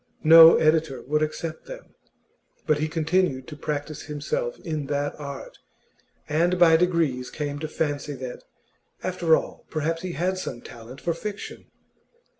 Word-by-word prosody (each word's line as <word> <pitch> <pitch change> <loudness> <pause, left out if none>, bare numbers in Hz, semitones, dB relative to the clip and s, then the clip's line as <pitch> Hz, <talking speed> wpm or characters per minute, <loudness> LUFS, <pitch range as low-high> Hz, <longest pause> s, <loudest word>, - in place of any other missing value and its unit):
No 165 +1 +10
editor 155 -3 +1
would 150 +3 0
accept 155 +1 -4
them; - - -10 0.7
but 155 -2 +2
he 155 - 0
continued 160 -4 0
to 150 - -8
practise 150 0 -4
himself 480 - -3
in 155 -4 -4
that 145 0 -1
art, 140 -2 -8 0.7
and 170 +4 +1
by 170 -2 +6
degrees 160 -7 +1
came 145 -1 -4
to 155 - -4
fancy 145 -2 -3
that, 130 -2 -7 0.6
after 175 -3 +3
all, - - -5
perhaps 165 +1 -2
he 185 -2 -5
had 185 +4 -1
some 120 -9 -6
talent 120 +3 -11
for 170 - 0
fiction. 205 +4 -7
155 Hz, 145 wpm, -25 LUFS, 145-170 Hz, 0.7 s, No